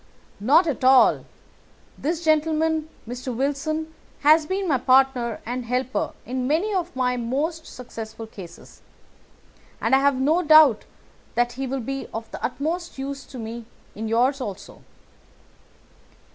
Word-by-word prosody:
"Not 290 - +4
at 300 -5 -3
all. 260 0 +5 0.7
This 330 +3 -3
gentleman, 315 0 +1 0.2
Mr. 245 +1 -5
Wilson, 310 +4 -2 0.3
has 305 +1 +5
been 380 +2 -2
my 275 -6 +2
partner 255 -3 +2
and 245 +2 -3
helper 255 +2 -2
in 255 +1 -3
many 340 +9 +1
of 350 -6 -2
my 250 -1 0
most 290 +8 -2
successful 225 -2 -8
cases, 185 -6 -13 1.0
and 225 - 0
I 265 - +7
have 275 -1 +2
no 310 +6 +2
doubt 310 -8 +6 0.5
that 240 0 +2
he 265 +2 -4
will 265 0 -3
be 270 +3 -5
of 225 0 -6
the - - -8
utmost 315 +8 -3
use 275 +1 -5
to 260 - -11
me 230 0 -6 0.3
in 220 +2 -5
yours 250 +5 +2
also." 200 -5 -7
270 Hz, 140 wpm, -23 LUFS, 245-310 Hz, 1.0 s, I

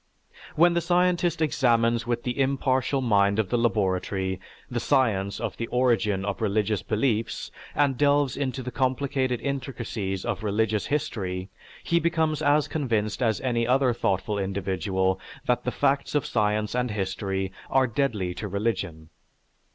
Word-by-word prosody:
When 170 +2 +5
the 170 - +1
scientist 175 -1 +2
examines 115 -5 +2
with 120 -1 -1
the 125 +2 -3
impartial 135 0 +1
mind 100 -4 +3
of 110 -4 0
the - - +1
laboratory 95 -4 0 0.3
the - - -2
science 100 -7 +1
of - - -4
the 115 - -3
origin 110 -6 +1
of 100 +1 -3
religious 105 -1 +1
beliefs 110 0 -1 0.2
and 140 -3 +2
delves 145 -2 +3
into 130 -2 -2
the 125 - -5
complicated 130 0 0
intricacies 120 -8 -3
of - - -2
religious 110 0 0
history, 100 -11 -2 0.3
he 170 - +2
becomes 160 -2 +1
as 145 +1 +3
convinced 115 -7 -1
as 110 -4 +2
any 120 -3 0
other 130 0 +3
thoughtful 100 -1 -1
individual 95 -1 -1 0.3
that - - +1
the - - 0
facts 140 +1 0
of 145 - +2
science 105 0 0
and 125 0 0
history 95 -1 -2 0.2
are 135 0 +4
deadly 110 -7 -1
to 105 +4 -5
religion. 95 -6 -3
115 Hz, 145 wpm, -26 LUFS, 100-135 Hz, 0.3 s, When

